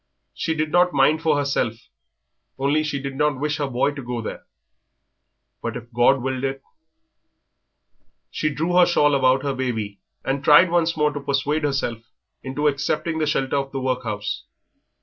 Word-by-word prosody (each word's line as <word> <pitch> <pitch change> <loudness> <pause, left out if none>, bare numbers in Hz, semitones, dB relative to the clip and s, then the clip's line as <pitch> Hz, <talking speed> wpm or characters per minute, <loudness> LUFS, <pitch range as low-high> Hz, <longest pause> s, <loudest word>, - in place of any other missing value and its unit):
She 160 - -2
did 155 0 -1
not 180 0 +3
mind 145 +3 +3
for 155 -2 +2
herself, 140 -5 0 0.8
only 140 +3 +1
she 145 -2 -2
did 135 0 -5
not 150 -1 +1
wish 150 +1 -1
her 145 - -1
boy 130 +2 +1
to 140 -1 -7
go 120 -1 -4
there. 110 - -7 1.1
But 115 0 -3
if 120 0 -12
God 120 +2 +3
willed 130 0 -2
it...." 135 0 -3 1.7
She 155 - -1
drew 160 +4 -2
her 180 - +7
shawl 145 -4 +3
about 130 0 +3
her 140 -1 -1
baby 110 -6 -3 0.3
and 135 +1 -1
tried 160 +5 +6
once 170 -1 +1
more 150 -1 +2
to 145 - -4
persuade 140 +2 -1
herself 135 -5 -1 0.4
into 140 +3 -1
accepting 155 +3 -1
the 155 - 0
shelter 135 -1 0
of 135 -1 -2
the 135 - -2
workhouse. 125 -6 -3
140 Hz, 170 wpm, -23 LUFS, 130-150 Hz, 1.7 s, her